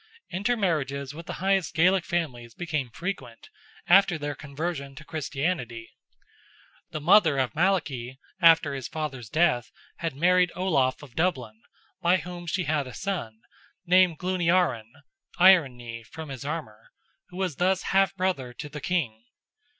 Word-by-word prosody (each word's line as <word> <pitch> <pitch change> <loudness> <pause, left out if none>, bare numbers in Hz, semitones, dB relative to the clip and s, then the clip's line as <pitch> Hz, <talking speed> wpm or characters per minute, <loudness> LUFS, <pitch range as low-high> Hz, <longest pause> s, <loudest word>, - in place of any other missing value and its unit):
Inter 205 +7 0
marriages 140 -8 -1
with 165 +2 -10
the - - -4
highest 195 -5 +1
Gaelic 180 +2 +3
families 125 -9 -3
became 155 -7 -3
frequent, 170 - -6 0.4
after 190 -1 +5
their 145 -1 -3
conversion 140 -1 -5
to 150 - -10
Christianity. 140 -6 -3 1.0
The 155 - -5
mother 165 -2 +5
of 130 -2 0
Malachy, 150 -8 0 0.2
after 165 -4 +6
his 135 -3 -4
father's 135 -8 -5
death, 155 -6 +2 0.3
had 165 -5 -3
married 180 +3 +3
Olaf 150 -8 +1
of 135 -5 -13
Dublin, 125 -11 -1 0.4
by 175 +2 +4
whom 175 -1 -8
she 185 +2 -1
had 150 -3 0
a 125 - -9
son, 135 - -4 0.4
named 180 -2 +4
Gluniarran 175 -10 +1 0.5
(Iron 175 -8 +6
Knee, 115 -1 -8
from 155 +6 -9
his 135 -2 -7
armour), 140 -8 -6 0.4
who 180 - -11
was 185 -7 -2
thus 185 +1 +1
half 195 0 +3
brother 180 -10 -1
to 150 - -8
the 150 0 -8
King. 135 -10 -2
155 Hz, 145 wpm, -26 LUFS, 130-180 Hz, 1.0 s, after